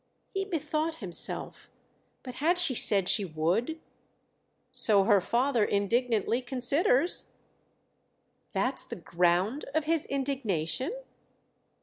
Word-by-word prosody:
He 390 Hz, 0 st, -3 dB
bethought 320 Hz, -3 st, -3 dB
himself. 190 Hz, -, +1 dB, 0.5 s
"But 255 Hz, -, -8 dB
had 345 Hz, +4 st, +2 dB
she 350 Hz, -7 st, +3 dB
said 200 Hz, -5 st, +5 dB
she 205 Hz, -, +1 dB
would?" 185 Hz, -, -2 dB, 0.9 s
"So 205 Hz, -3 st, +4 dB
her 205 Hz, -1 st, +3 dB
father 240 Hz, +3 st, 0 dB
indignantly 230 Hz, +3 st, 0 dB
considers." 265 Hz, +5 st, 0 dB, 1.3 s
"That's -, -, 0 dB
the -, -, -8 dB
ground 180 Hz, -, -1 dB
of 315 Hz, -, +1 dB
his 320 Hz, 0 st, -1 dB
indignation?" 260 Hz, -, -2 dB
245 Hz, 100 wpm, -28 LUFS, 200-295 Hz, 1.3 s, said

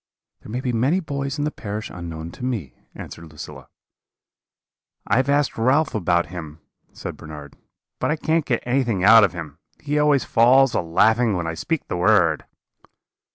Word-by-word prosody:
"'There -, -, -11 dB
may 125 Hz, +3 st, -3 dB
be 125 Hz, -2 st, -2 dB
many 130 Hz, +11 st, +2 dB
boys 140 Hz, -4 st, -4 dB
in 145 Hz, -, -1 dB
the 150 Hz, -, -1 dB
parish 105 Hz, -3 st, -6 dB
unknown 85 Hz, -2 st, -7 dB
to 125 Hz, -, -11 dB
me,' 110 Hz, -, -3 dB, 0.2 s
answered 85 Hz, -2 st, -10 dB
Lucilla. 75 Hz, -, -10 dB, 1.4 s
"'I -, -, +1 dB
have 130 Hz, +1 st, +1 dB
asked 140 Hz, -4 st, +1 dB
Ralph 140 Hz, +6 st, +2 dB
about 85 Hz, -4 st, +1 dB
him,' 80 Hz, -3 st, -8 dB, 0.3 s
said -, -, -7 dB
Bernard; 75 Hz, -2 st, -10 dB, 0.4 s
'but -, -, 0 dB
I 150 Hz, -, +1 dB
can't 160 Hz, +1 st, 0 dB
get 120 Hz, -4 st, -1 dB
anything 120 Hz, -6 st, 0 dB
out 110 Hz, +2 st, +8 dB
of 95 Hz, -4 st, +2 dB
him; 80 Hz, -4 st, -8 dB, 0.2 s
he 150 Hz, 0 st, -1 dB
always 150 Hz, -3 st, +3 dB
falls 130 Hz, +3 st, +4 dB
a -, -, +1 dB
laughing 110 Hz, +6 st, +2 dB
when 85 Hz, -, -3 dB
I 80 Hz, -, -3 dB
speak 135 Hz, -, -3 dB
the -, -, -3 dB
word.' 90 Hz, -4 st, +3 dB
115 Hz, 175 wpm, -22 LUFS, 85-135 Hz, 1.4 s, out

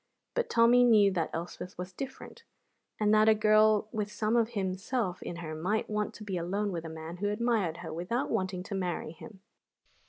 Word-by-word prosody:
But -, -, -1 dB
Tommy 235 Hz, +2 st, +5 dB
knew 215 Hz, -5 st, +6 dB
that 170 Hz, -4 st, -1 dB
Elspeth 175 Hz, +2 st, -6 dB
was 180 Hz, +1 st, -6 dB
different, 270 Hz, +7 st, -8 dB, 0.6 s
and 210 Hz, 0 st, +3 dB
that 215 Hz, +1 st, +6 dB
a 220 Hz, -, +6 dB
girl 215 Hz, 0 st, +4 dB
with 210 Hz, -2 st, -3 dB
some 215 Hz, +2 st, 0 dB
of 230 Hz, -1 st, +3 dB
himself 190 Hz, +1 st, -2 dB
in 175 Hz, -, -5 dB
her 165 Hz, -2 st, -6 dB
might 185 Hz, +8 st, -1 dB
want 210 Hz, 0 st, -1 dB
to 215 Hz, -, -9 dB
be 195 Hz, -3 st, -3 dB
alone 195 Hz, +4 st, -1 dB
with 170 Hz, -2 st, -4 dB
a -, -, -5 dB
man 160 Hz, +2 st, -7 dB
who 205 Hz, +2 st, -1 dB
admired 210 Hz, -6 st, 0 dB
her -, -, -5 dB
without 180 Hz, +10 st, -2 dB
wanting 185 Hz, -4 st, -1 dB
to 190 Hz, -, -7 dB
marry 180 Hz, -4 st, -2 dB
him. 190 Hz, +4 st, -13 dB
205 Hz, 195 wpm, -30 LUFS, 180-220 Hz, 0.6 s, knew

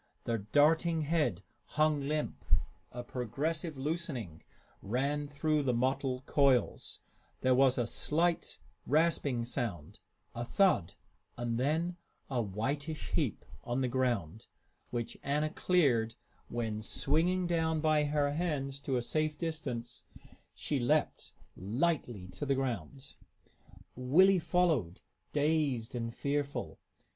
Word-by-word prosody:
The 115 Hz, -1 st, -1 dB
darting 160 Hz, -, +3 dB
head 155 Hz, +1 st, 0 dB, 0.3 s
hung 155 Hz, -1 st, +3 dB
limp; 150 Hz, 0 st, -2 dB, 0.5 s
a 120 Hz, 0 st, -6 dB
progressive 145 Hz, -, -3 dB
loosening 135 Hz, -, -3 dB, 0.4 s
ran 140 Hz, +7 st, -1 dB
through 150 Hz, +1 st, +1 dB
the 130 Hz, -4 st, +1 dB
mottled 130 Hz, +1 st, 0 dB
coils; 135 Hz, -5 st, +2 dB, 0.4 s
there 130 Hz, 0 st, +4 dB
was 130 Hz, 0 st, +4 dB
a 120 Hz, -, +1 dB
slight 165 Hz, +8 st, 0 dB, 0.3 s
rasping 145 Hz, -5 st, +2 dB
sound, 115 Hz, -, -4 dB, 0.3 s
a 120 Hz, -, -3 dB
thud, 125 Hz, -, +2 dB, 0.4 s
and 120 Hz, -1 st, -1 dB
then 165 Hz, +6 st, 0 dB, 0.3 s
a 125 Hz, -2 st, +1 dB
whitish 140 Hz, -, -3 dB
heap -, -, -1 dB, 0.2 s
on 120 Hz, +2 st, -1 dB
the 130 Hz, -, +1 dB
ground, 120 Hz, -7 st, -1 dB, 0.4 s
which 120 Hz, -2 st, -4 dB
Anna 150 Hz, +2 st, 0 dB
cleared 130 Hz, -12 st, +2 dB, 0.3 s
when, 110 Hz, -3 st, -3 dB
swinging 165 Hz, +11 st, +1 dB
down 160 Hz, -2 st, +1 dB
by 155 Hz, -1 st, +3 dB
her 145 Hz, -1 st, +1 dB
hands 145 Hz, -4 st, -2 dB
to 135 Hz, -2 st, -1 dB
a 120 Hz, -, -1 dB
safe 155 Hz, +3 st, 0 dB
distance, 130 Hz, -8 st, -4 dB, 0.5 s
she 145 Hz, -, -1 dB
leaped 145 Hz, +5 st, +1 dB, 0.2 s
lightly 120 Hz, -, -1 dB
to 145 Hz, -, -5 dB
the 135 Hz, -, +3 dB
ground. 130 Hz, -, -4 dB, 0.8 s
Willie 180 Hz, +10 st, +5 dB
followed, 160 Hz, -, +1 dB, 0.3 s
dazed 145 Hz, -6 st, +1 dB
and 115 Hz, -1 st, -3 dB
fearful. 140 Hz, +3 st, -2 dB
140 Hz, 115 wpm, -32 LUFS, 120-155 Hz, 0.8 s, Willie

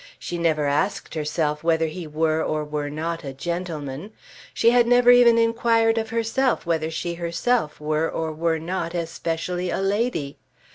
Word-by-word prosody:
She 175 Hz, -, -5 dB
never 160 Hz, -3 st, +1 dB
asked 145 Hz, +8 st, -1 dB
herself 150 Hz, -1 st, -1 dB
whether 165 Hz, -1 st, +2 dB
he 160 Hz, +1 st, -6 dB
were 155 Hz, +1 st, 0 dB
or 155 Hz, 0 st, -1 dB
were 150 Hz, -1 st, -3 dB
not 165 Hz, +3 st, -4 dB
a 135 Hz, -2 st, -6 dB
gentleman. 165 Hz, +2 st, -5 dB, 0.4 s
She 230 Hz, -, +3 dB
had 240 Hz, -1 st, +4 dB
never 245 Hz, 0 st, +6 dB
even 240 Hz, -1 st, +6 dB
inquired 230 Hz, 0 st, +2 dB
of 220 Hz, 0 st, -4 dB
herself 230 Hz, +2 st, 0 dB
whether 160 Hz, -2 st, 0 dB
she 170 Hz, +1 st, -3 dB
herself 170 Hz, +1 st, -1 dB
were 155 Hz, +1 st, 0 dB
or 160 Hz, -1 st, -3 dB
were 165 Hz, +1 st, 0 dB
not 170 Hz, +1 st, -4 dB
especially 170 Hz, +1 st, -3 dB
a -, -, -1 dB
lady. 195 Hz, -, -1 dB
170 Hz, 160 wpm, -23 LUFS, 155-220 Hz, 0.4 s, never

